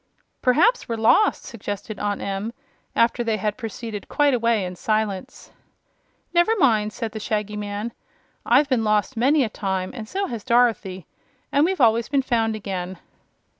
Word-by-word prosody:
"Perhaps 315 - +3
we're 230 - 0
lost," 225 - +3
suggested 205 -3 -6
Aunt 205 -1 -2
Em, 200 +3 -3 0.4
after 235 +1 +2
they 225 -2 0
had 210 +1 -1
proceeded 225 -3 -6
quite 290 -1 +3
a 250 - +2
way 230 -4 +1
in 180 0 -6
silence. 215 -1 -2 0.8
"Never 345 +6 +4
mind," 220 - +3
said 225 0 -4
the 220 - -6
Shaggy 210 -1 -2
Man; 210 +2 -4 0.5
"I've 270 +5 +4
been 255 -4 +1
lost 215 +4 +1
many 270 +5 +3
a - - 0
time 190 -3 -3
and 225 -4 -7
so 395 +1 -1
has 235 - -5
Dorothy 230 -7 +1 0.5
and 285 +2 +4
we've 375 0 -1
always 230 -2 +3
been 275 -1 +2
found 225 -3 +1
again." 190 -3 -5
225 Hz, 165 wpm, -23 LUFS, 210-255 Hz, 0.8 s, Never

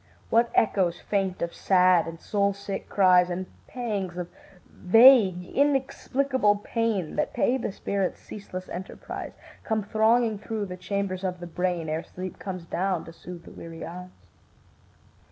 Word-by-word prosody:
What 230 +1 +4
echoes 185 -5 +2
faint 195 -3 -1
of 170 - -3
sad 180 -3 +4
and 165 0 -7
soul 200 +1 0
sick 200 0 -6
cries, 180 -2 +5
And 180 +1 -3 0.2
pangs 205 -8 -3
of 175 -1 -5 0.4
vague 205 -3 +6
inexplicable 270 -3 +1
pain 210 -4 -2
That - - -1
pay 250 - +2
the 225 - -3
spirit's 195 -1 -2
ceaseless 185 -3 -8
enterprise, 185 +2 -7 0.3
Come 220 -2 -1
thronging 220 +1 +2
through 215 0 -3
the 180 -2 -6
chambers 190 0 -3
of 180 -1 -2
the 175 - -7
brain 175 -1 -2
Ere 155 +1 -1
sleep 185 0 -8
comes 185 -3 -6
down 185 0 -1
to 165 - -11
soothe 175 0 -10
the - - -13
weary 165 -1 -8
eyes. 180 +2 -8
190 Hz, 150 wpm, -26 LUFS, 180-215 Hz, 0.4 s, vague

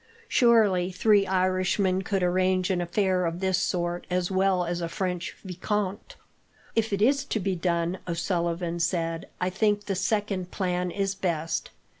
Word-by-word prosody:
Surely 210 - +4
three 200 +1 +3
Irishmen 185 0 +1
could 195 0 -1
arrange 185 +1 +2
an 180 -1 0
affair 185 +1 +1
of 170 0 -2
this 190 -1 +1
sort 175 0 -2
as 180 0 0
well 190 -1 +2
as 175 +1 -2
a 170 - -2
French 180 +1 -3
vicomte." 200 - -3 0.6
"If 225 -1 +1
it 200 +1 +1
is 275 +3 +3
to 220 - -1
be 190 -1 -1
done," 170 +1 -1
O'Sullivan 170 0 -1
said, 165 -1 -1
"I 180 +1 0
think 205 +1 +1
the 195 - -1
second 195 -1 -1
plan 180 -2 -1
is 195 +1 -1
best. 170 -5 -2
185 Hz, 155 wpm, -27 LUFS, 175-195 Hz, 0.6 s, Surely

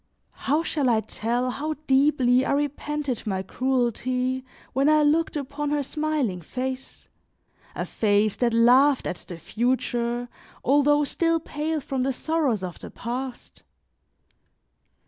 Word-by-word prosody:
How 300 +4 0
shall 290 -5 0
I 225 -2 +3
tell 240 +4 -2
how 305 +4 -3
deeply 265 -2 +4
I - - 0
repented 290 -3 -2
my 190 -2 -1
cruelty 255 +2 -1 0.3
when 275 +3 +3
I 305 0 +5
looked 315 +3 +2
upon 285 +1 -3
her 295 -1 0
smiling 290 - -1
face, 260 +8 -5 0.7
a - - -2
face 210 -1 +1
that 240 -1 +2
laughed 250 +5 +5
at 180 - -4
the 175 - -7
future, 240 +3 -1 0.4
although 290 +2 +4
still 330 +3 +1
pale 310 0 -3
from 270 -2 -3
the 265 +1 0
sorrows 280 - 0
of 180 -2 -6
the - - -9
past! 250 +1 -6
260 Hz, 130 wpm, -25 LUFS, 240-295 Hz, 0.7 s, I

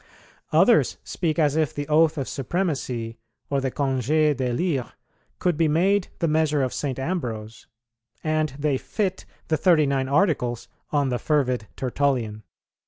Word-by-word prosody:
Others - - +4
speak 165 -3 -2
as 150 -3 +2
if 155 -3 0
the 145 0 -4
oath 155 +1 +3
of 135 - -2
supremacy 130 -7 -2 0.3
or 140 -1 +1
the 135 - 0
congé 145 +3 +1
d'élire 130 +2 -1 0.4
could 175 -4 0
be 165 -1 +3
made 185 +5 +2
the 170 - 0
measure 155 -2 +2
of 130 - -2
St. 135 -4 -3
Ambrose, 115 -9 -4 0.6
and 155 0 +1
they 145 -2 0
fit 190 -3 -2 0.2
the 160 - +2
Thirty 160 -2 +4
nine 135 -1 0
Articles 130 - +1 0.2
on 145 -2 +1
the 125 -1 -1
fervid 130 -7 0
Tertullian. 125 -5 -1
145 Hz, 145 wpm, -24 LUFS, 130-160 Hz, 0.6 s, Others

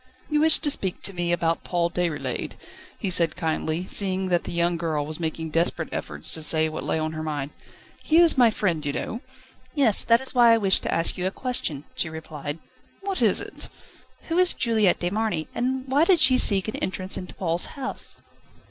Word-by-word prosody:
"You 300 - +2
wished 320 +1 +6
to 295 - +5
speak 190 -8 -2
to 195 - -1
me 175 -1 -2
about 165 -1 0
Paul 170 -1 -1
Déroulède," 170 -4 -3 0.4
he 195 -5 -3
said 170 -1 +3
kindly, 160 0 -2
seeing 190 -1 0
that 175 -1 0
the - - -5
young 170 0 +1
girl 160 -3 -2
was 155 +2 -2
making 160 -1 -4
desperate 165 0 0
efforts - - -5
to 160 - -1
say 155 0 +3
what 155 - -6
lay - - -1
on 155 0 -2
her 155 0 -6
mind. 150 -2 -4 0.5
"He 320 - +2
is 340 -1 +7
my 245 -3 +5
friend, 175 -8 -1
you 145 -1 -3
know." 230 - -5 0.5
"Yes; 255 -8 +4
that 230 0 +4
is 265 - -4
why 240 -2 +6
I - - +4
wished 195 -3 +2
to - - -3
ask 165 +2 +1
you 180 - 0
a - - +1
question," 195 - -3
she 165 - -2
replied. 155 -2 -7 0.4
"What 390 -1 -3
is - - +3
it?" - - -6 0.5
"Who 335 +2 -1
is 365 0 +4
Juliette 220 -6 +1
de 175 0 -1
Marny, 205 -7 -2
and 260 +2 -2
why 275 +4 +3
did 360 -1 +4
she 270 -4 +5
seek 200 -6 +3
an 215 - -4
entrance 185 0 -3
into 180 - -7
Paul's 170 -1 0
house?" 270 -1 -6
180 Hz, 210 wpm, -24 LUFS, 160-235 Hz, 0.5 s, is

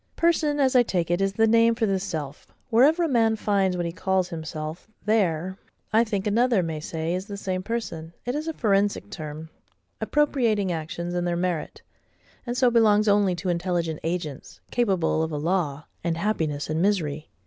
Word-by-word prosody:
PERSON, 310 -3 +2
as 265 -2 +3
I 250 - +8
take 175 -7 -1
it, 175 +2 +1
is 195 0 +1
the 225 +3 +3
name 230 +1 +4
for 225 - +1
this 195 -2 0
self. 150 -3 -6 0.2
Wherever 290 +10 +5
a - - +2
man 225 -5 +3
finds 195 -4 +1
what 175 - -1
he 170 - -2
calls 185 +1 0
himself, 160 0 -6 0.2
there, 190 -4 +1 0.3
I 225 +2 +6
think, 205 -4 -2
another 225 -1 +3
may 160 -2 -3
say 160 +2 -3
is 185 +2 -3
the 200 -2 -6
same 185 -2 -2
person. 185 -7 -4
It 245 - -1
is 305 +3 -3
a 325 - -1
forensic 205 -4 +1
term, 155 -3 -7 0.5
appropriating 235 -10 +1
actions 170 +2 -4
and 175 0 -1
their 175 - 0
merit; 175 -3 -3 0.6
and 240 +1 -2
so 250 -2 +4
belongs 215 -2 +4
only 200 -3 +3
to 180 +2 -3
intelligent 170 -2 -1
agents, 165 -4 -4
capable 190 -9 +1
of 160 0 -1
a 150 - -2
law, 155 -3 -1 0.2
and 165 -1 -1
happiness, 160 -7 -1
and 155 +1 -1
misery. 160 -7 0
190 Hz, 185 wpm, -25 LUFS, 165-225 Hz, 0.6 s, I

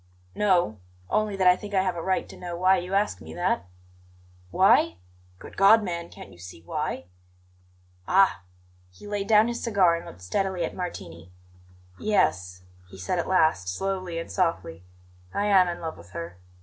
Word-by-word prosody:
"No; 175 - +1 0.3
only 215 -1 +1
that 190 -1 0
I 180 0 +7
think 205 +2 -7
I 190 - +3
have 185 -2 -1
a 170 - -4
right 190 +2 -1
to - - -12
know 175 -1 -6
why 185 +2 +4
you 180 +2 -3
ask 205 +1 0
me - - -10
that." 175 - -1 0.8
"Why? 85 - +4 0.4
Good - - -12
God, 210 +3 +6
man, 170 -3 -4
can't - - -12
you 85 - -17
see 90 -1 -11
why?" 85 - -4 1.0
"Ah!" 195 - +4 0.5
He 90 - -16
laid 205 -1 -3
down 215 0 +5
his 240 0 -4
cigar 195 -7 +3
and 170 - -7
looked 90 +1 -12
steadily 185 - -1
at - - -6
Martini. 85 - -7 0.7
"Yes," 90 - 0 0.3
he 95 - -12
said 95 - -2
at - - -2
last, 155 - +2
slowly 185 - -3
and 165 - -5
softly. 165 - -1 0.5
"I 205 - 0
am 195 -3 +5
in 175 -1 -4
love 160 -1 -6
with 85 +1 -16
her. 85 +1 -7
180 Hz, 175 wpm, -26 LUFS, -, 1.0 s, I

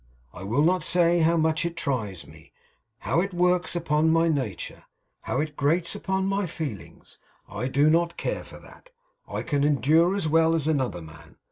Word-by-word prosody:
I - - -10
will 115 +10 0
not 180 +2 +2
say 170 +1 +2
how 165 +1 +3
much 160 0 +1
it 170 0 -4
tries 105 - -3
me; - - -17 0.5
how 170 - +1
it 195 -1 -4
works 180 0 +1
upon 160 -2 +1
my 165 +1 +3
nature; 130 - -4 0.4
how 130 - -2
it 150 0 -3
grates 165 +5 0
upon 190 0 -2
my 195 0 -1
feelings. 105 - -8 0.3
I 125 - -4
do 140 +3 +2
not 170 +2 +2
care - - -3
for - - -13
that. - - -17 0.4
I - - -4
can 140 -1 0
endure 150 - +3
as 195 -5 -1
well 165 +1 +3
as 160 -3 -1
another 130 - -1
man. 80 -1 -14
160 Hz, 180 wpm, -25 LUFS, 140-170 Hz, 0.5 s, how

